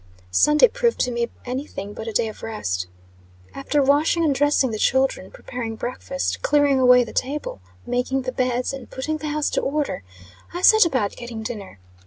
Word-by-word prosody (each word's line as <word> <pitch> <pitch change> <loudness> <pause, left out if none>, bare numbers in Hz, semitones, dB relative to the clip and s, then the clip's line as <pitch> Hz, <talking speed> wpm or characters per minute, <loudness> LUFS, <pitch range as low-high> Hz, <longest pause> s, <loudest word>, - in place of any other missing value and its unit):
Sunday 300 - +5
proved 475 0 0
to 250 - +1
me 235 0 -1 0.2
any 260 +4 -4
thing 200 +1 -7
but 220 - -7
a - - -2
day 225 +1 +1
of 215 - -9
rest. 90 - -3 0.7
After 280 +1 0
washing 300 +4 +3
and 295 - +3
dressing 280 -2 +2
the 215 - -4
children, 265 -8 +1
preparing 230 -3 -6
breakfast, 260 +4 -3
clearing 285 -2 +3
away 250 -1 +6
the - - -9
table, 270 - -3 0.2
making 250 +2 -1
the 255 - -3
beds, 250 0 -1
and 270 - -8
putting 310 +4 -3
the 310 - -6
house 300 0 -1
to - - 0
order, 280 -9 -2 0.5
I 355 - -4
set 435 -1 +7
about 255 -10 0
getting 235 -2 -7
dinner. 210 - -7
260 Hz, 185 wpm, -22 LUFS, 235-290 Hz, 0.7 s, set